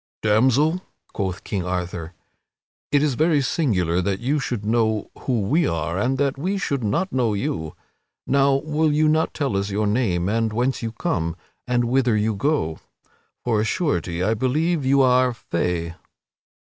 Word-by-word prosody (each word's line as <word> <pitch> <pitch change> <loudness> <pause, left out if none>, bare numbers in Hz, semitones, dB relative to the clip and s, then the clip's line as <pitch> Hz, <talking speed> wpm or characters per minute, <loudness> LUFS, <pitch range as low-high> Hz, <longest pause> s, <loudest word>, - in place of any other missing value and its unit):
"Damsel," 130 +11 +3 0.3
quoth 95 -2 -3
King 95 -3 -3
Arthur, 90 -1 -4 0.8
"it 145 0 +3
is 150 -3 +2
very 155 +3 +2
singular 95 - +1
that 95 +1 -1
you 140 +5 0
should 120 -6 -3
know 110 -1 +1
who 125 -5 -1
we 150 - +2
are 80 0 -2
and 130 +5 +1
that 140 0 0
we 190 +7 -1
should 140 -9 -2
not 145 - -1
know 120 -5 +1
you. 80 -5 -3 0.5
Now, 140 0 +3
will 155 +2 +1
you 155 +1 +3
not 155 +1 +1
tell 140 -8 -1
us 100 +1 -1
your 105 +2 0
name 100 -5 +1
and 110 +1 0
whence 125 +4 0
you 115 -1 -3
come 85 -6 -2 0.3
and 125 -1 +2
whither 120 -2 +2
you 110 +1 +1
go? 100 - -1 0.6
For 115 -3 +1
of - - +2
a - - 0
surety 90 - -1
I 110 +4 +2
believe 150 +7 0
you 135 +1 +4
are 125 -1 +3
Fay." 85 -5 -2
120 Hz, 170 wpm, -23 LUFS, 100-140 Hz, 0.8 s, you